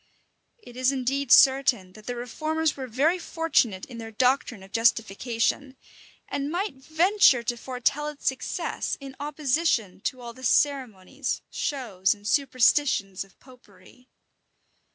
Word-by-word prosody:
It 430 - -15
is 255 +1 +2
indeed 270 0 -2
certain, 260 -9 +5
that 215 +1 -15
the 245 - -3
reformers 310 +7 -2
were 265 -2 -6
very 295 +10 +1
fortunate 285 - 0
in 240 -2 -10
their 225 -1 -7
doctrine 245 -2 0
of 195 - -15
justification; 230 +4 0 0.5
and 280 0 -3
might 375 +6 -2
venture 315 - +3
to 240 - -1
foretell 255 +4 -2
its 300 -1 -9
success, 265 - -2
in 270 -1 -10
opposition 285 - 0
to 255 - -2
all 240 -1 -8
the 260 +2 -14
ceremonies, 255 -8 0
shows, 215 - -1
and 205 0 -11
superstitions 255 -7 +2
of 195 -2 -24
Popery. 255 0 -19
255 Hz, 135 wpm, -26 LUFS, 230-285 Hz, 0.5 s, certain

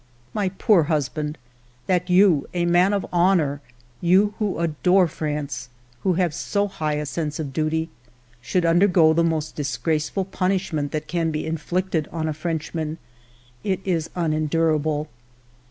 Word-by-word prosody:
My 200 -3 0
poor 190 -3 +3
husband, 150 0 -1 0.5
that 180 0 0
you, 180 -5 +4
a 175 -1 +1
man 175 +3 +4
of 200 -2 0
honor, 170 -6 +2 0.4
you 190 +4 +4
who 210 -3 -1
adore 170 +3 +3
France, 150 -4 -4 0.3
who 190 - +2
have 175 -2 +1
so 200 +5 -1
high 155 -6 -2
a 150 0 -2
sense 150 +1 -3
of 140 -4 -4
duty, 160 +1 0 0.5
should 175 +7 0
undergo 170 -1 +5
the 170 +1 +2
most 160 -2 -1
disgraceful 150 - -1
punishment 185 -6 -1
that 155 0 -3
can 170 -2 0
be 155 -1 -3
inflicted 165 0 -1
on 160 -1 -2
a 155 - -1
Frenchman, 160 0 -3 0.3
— - - -30 0.3
it 190 -2 0
is 170 -4 0
unendurable. 155 -2 0
165 Hz, 145 wpm, -23 LUFS, 155-180 Hz, 0.5 s, undergo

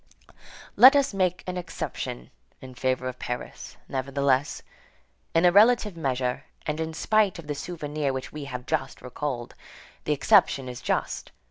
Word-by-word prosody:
Let 260 +3 +9
us 280 -4 +2
make 185 -2 0
an 180 0 -4
exception 165 - -5 0.3
in 130 -1 -11
favor 130 0 -1
of 125 0 -6
Paris, 120 0 -6
nevertheless. 140 +1 0 0.7
In 165 +2 +4
a 175 - +7
relative 210 0 +5
measure, 130 -3 -2 0.2
and 150 0 -2
in 160 0 -3
spite 215 +1 +2
of 170 - -9
the 145 - -3
souvenir 150 -2 -3
which 130 0 -5
we 150 -2 -7
have 125 -2 -6
just 145 -4 -3
recalled, 125 -1 -4 0.5
the 150 - +2
exception 135 -1 +3
is 125 -1 -7
just. - - -2
145 Hz, 150 wpm, -26 LUFS, 130-175 Hz, 0.7 s, Let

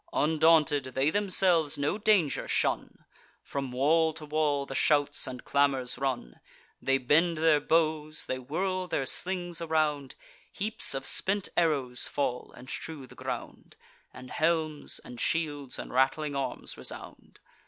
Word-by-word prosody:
Undaunted, 155 -2 +3
they 135 +3 +2
themselves 180 -6 +2
no 145 +5 0
danger 205 -9 +2
shun; - - -1 0.4
From 135 -2 -4
wall 160 +5 +3
to 155 0 -9
wall 150 -2 0
the 135 - -7
shouts 145 +1 +2
and 125 -1 -7
clamours 140 -3 +2
run. 130 - -3 0.4
They 135 0 +2
bend 160 +6 +2
their 155 -1 +4
bows; 155 0 0
they 130 - -3
whirl 185 +8 -2
their 135 - -1
slings 175 +1 -1
around; 155 -4 0 0.4
Heaps 215 -7 0
of 135 0 -4
spent 195 0 +2
arrows 140 -7 +1
fall, 125 -4 -2
and 125 - -12
strew 150 0 -6
the - - -15
ground; - - -7 0.4
And 125 0 -11
helms, 155 -2 0
and 120 - -9
shields, 145 -5 -1
and - - -7
rattling 135 +3 +1
arms 135 -2 -4
resound. - - -9
150 Hz, 140 wpm, -29 LUFS, 135-165 Hz, 0.4 s, their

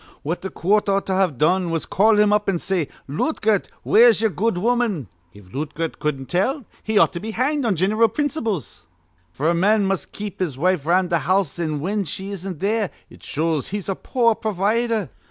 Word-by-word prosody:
What 165 +5 -3
th' 190 - -5
coort 205 +4 +1
ought 195 0 +1
to've 185 -7 +1
done 175 +5 +2
was 165 -1 -1
to - - -11
call 215 +2 +4
him 210 0 +4
up, 210 -1 +1
an' 190 - +1
say: 175 -3 -1 0.2
'Lootgert, 210 - 0 0.2
where's 230 -1 +6
ye'er 220 -1 +1
good 210 +1 0
woman?' 220 - 0 0.2
If 95 -1 -17
Lootgert 155 +3 -4
cudden't 135 -3 -2
tell, 245 - 0 0.2
he 220 -1 -1
ought - - +5
to 170 - -4
be 220 - -6
hanged 260 +5 0
on 215 -4 +2
gin'ral 210 +7 +3
principles; 230 - -3 0.4
f'r 150 - 0
a - - +2
man 200 +4 +3
must 195 -1 -2
keep 205 -1 -7
his 165 -8 -2
wife 175 -1 +1
around 180 +1 +2
th' 170 -2 +2
house, 185 0 0
an' 155 -4 -2
whin 200 +4 -1
she 190 +6 -5
isn't 190 -4 -6
there, 210 0 +1 0.2
it - - -15
shows 155 -2 -1
he's 200 0 -4
a - - +1
poor 230 +3 +1
provider. 215 0 -1
195 Hz, 200 wpm, -22 LUFS, 165-215 Hz, 0.4 s, where's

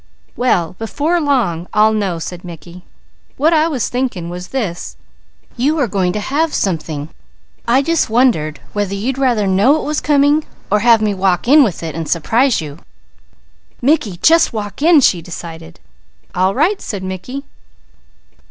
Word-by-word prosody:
"Well, 180 -9 0
before 300 +10 -1
long, 215 - 0
I'll 215 +1 +4
know," 200 -5 -1
said 175 +2 -7
Mickey. 175 +1 -11 0.6
"What 315 +5 +3
I 315 0 +3
was 270 -9 -2
thinking 240 -10 -3
was 180 +1 -7
this: 205 -10 -4 0.6
you 285 +6 +1
are 280 -5 +1
going 190 -3 0
to 210 - -2
have 295 +8 -1
something. 160 -5 -2 0.6
I 255 +4 +3
just 330 -3 +1
wondered 220 - +1
whether 205 -1 -2
you'd 250 +7 -3
rather 245 -6 +2
know 205 +11 +3
it - - -5
was 300 0 -1
coming, 290 +1 +3 0.3
or 210 - +3
have 230 -1 +4
me 210 -1 +1
walk 190 +1 0
in 295 +4 +7
with 190 -9 -2
it 160 -2 -4
and 165 -2 -5
surprise 225 - +1
you." 150 0 -8 1.0
"Mickey, 270 -3 +2
you 175 - -9
just 330 -4 +4
walk 210 +2 -5
in," 320 -1 +6
she 180 -8 +3
decided. 165 -1 -9 0.5
"All 185 +2 +1
right!" 350 +10 +1
said 200 -5 -5
Mickey. 190 +9 -6
215 Hz, 160 wpm, -16 LUFS, 180-275 Hz, 1.0 s, in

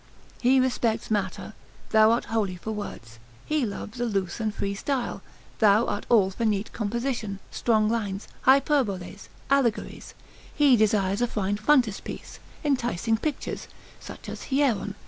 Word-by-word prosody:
He 260 +2 +5
respects 235 -4 0
matter, 205 0 -2 0.4
thou 220 0 +6
art 230 +1 +2
wholly 205 -5 0
for 200 +5 -6
words; 120 - -7 0.3
he 305 -6 0
loves 210 +3 -7
a - - +1
loose 195 -3 -2
and 220 -1 0
free 200 -1 -3
style, 255 +5 -2 0.4
thou 215 +1 +5
art 205 - -3
all 205 -5 +4
for 215 - -4
neat 210 -2 0
composition, 225 -1 -2
strong 220 -2 +2
lines, 210 -3 -2 0.2
hyperboles, 255 -9 +2 0.2
allegories; 255 -5 0 0.4
he 285 -4 +6
desires 205 -2 +2
a 245 - +3
fine 205 -3 -1
frontispiece, 235 -2 0 0.2
enticing 240 - +1
pictures, 290 +4 -4 0.3
such - - -10
as - - -7
Hieron. 255 -8 +1
220 Hz, 140 wpm, -26 LUFS, 200-245 Hz, 0.4 s, thou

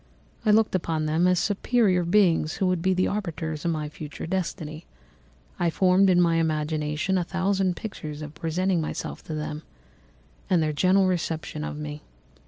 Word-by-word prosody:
I - - +5
looked 215 +1 +4
upon 165 -4 -1
them 160 +4 +2
as 180 0 +3
superior 205 -1 +2
beings 170 -3 +3
who 190 - -1
would 185 -2 +1
be 190 +1 +2
the 185 - +2
arbiters 165 -6 -3
of - - +2
my 155 -2 -2
future 150 0 -8
destiny. 165 -3 -4 0.7
I 175 - +2
formed 185 +3 +4
in 180 -1 +4
my 170 -2 +3
imagination 155 +2 0
a - - 0
thousand 190 0 0
pictures 155 -8 -6
of 150 0 -8
presenting 170 +3 0
myself 155 - -5
to 155 - -4
them, 150 0 -4 0.9
and 175 -4 +3
their 155 -1 0 0.3
reception 165 -4 -2
of 150 - -5
me. 150 0 -6
170 Hz, 165 wpm, -26 LUFS, 155-185 Hz, 0.9 s, I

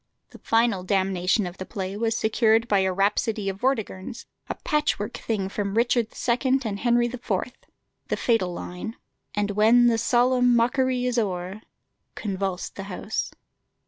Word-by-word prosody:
The - - -13
final 225 -4 +2
damnation 190 +1 +1
of 175 +1 -7
the 185 - -4
play 195 -2 -4
was 225 +1 0
secured 225 +1 +3
by 205 -3 +3
a 190 0 +2
rhapsody 200 +2 0
of 190 - -4
Vortigern's, 225 -3 -2 0.2
a - - -2
patch 300 0 0
work 205 - -4
thing 205 -4 -2
from 200 0 -3
"Richard 235 0 +2 0.2
II." 260 +2 +2
and 200 -2 -3
"Henry 240 0 +3
IV." 240 0 -6 0.8
The - - -1
fatal 225 -7 +1
line 180 +6 -6 0.4
"And 205 0 0
when 220 +4 +5
the 230 -1 +3
solemn 245 +1 +3
mockery 250 +1 +2
is 250 -1 +1
o'er," 190 -1 -3 0.5
convulsed 195 -3 -3
the 195 - -4
house. 200 +3 -3
220 Hz, 155 wpm, -25 LUFS, 195-240 Hz, 0.8 s, when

